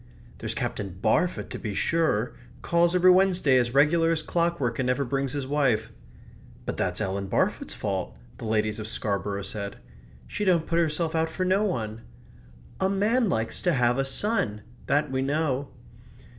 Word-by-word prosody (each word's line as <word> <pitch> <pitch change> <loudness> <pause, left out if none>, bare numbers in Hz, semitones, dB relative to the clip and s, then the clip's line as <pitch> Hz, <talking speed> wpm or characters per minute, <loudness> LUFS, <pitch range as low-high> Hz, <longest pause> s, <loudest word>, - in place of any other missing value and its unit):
"There's - - -4
Captain 95 -3 -4
Barfoot 170 - +1
to - - -5
be 105 -3 -4
sure 155 - +1 0.3
calls 170 +1 +2
every 180 0 +6
Wednesday 180 -7 +4
as 120 +1 -1
regular 165 +4 +4
as 160 -1 0
clockwork, 170 -9 0
and 130 - 0
never 125 +2 +1
brings 135 +1 -1
his 140 -2 -2
wife." 130 -6 +1 0.7
"But - - -3
that's - - -1
Ellen 100 +1 -2
Barfoot's - - 0
fault," - - -3 0.2
the - - -6
ladies 110 0 0
of 110 - -4
Scarborough 100 -2 -1
said. 100 0 -5 0.5
"She 210 - -4
don't 175 -5 +3
put 170 0 +1
herself 160 0 0
out 160 0 +1
for 185 +3 -2
no 190 +3 +2
one." 115 - -3 0.8
"A 190 - +2
man 215 +4 +2
likes 110 -7 -1
to 175 - +2
have 125 -1 +2
a - - +3
son 135 - 0 0.2
that 145 +1 +1
we 130 0 0
know." 140 -1 0
140 Hz, 170 wpm, -26 LUFS, 110-170 Hz, 0.8 s, every